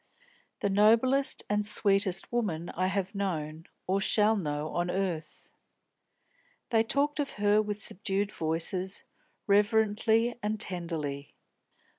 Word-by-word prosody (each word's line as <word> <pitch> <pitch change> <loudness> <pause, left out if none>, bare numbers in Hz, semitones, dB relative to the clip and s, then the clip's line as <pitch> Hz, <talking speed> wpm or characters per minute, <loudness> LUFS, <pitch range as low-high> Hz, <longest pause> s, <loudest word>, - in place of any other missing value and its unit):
The 200 - +1
noblest 230 +7 +3
and 210 0 0
sweetest 195 -2 +2
woman 180 -9 -2
I 185 +2 -1
have 190 0 -2
known, 165 -5 -4 0.2
or 195 +2 0
shall 210 +2 +3
know, 150 -5 -3
on 175 0 -2
earth." 175 -5 -4 1.2
They 225 -1 +4
talked 285 +6 0
of 285 - -2
her 210 +1 +3
with 210 -1 -4
subdued 200 +1 -2
voices, 170 +4 -1 0.4
reverently 220 +3 +2
and 210 +1 -2
tenderly. 165 -8 -4
200 Hz, 115 wpm, -29 LUFS, 175-215 Hz, 1.2 s, They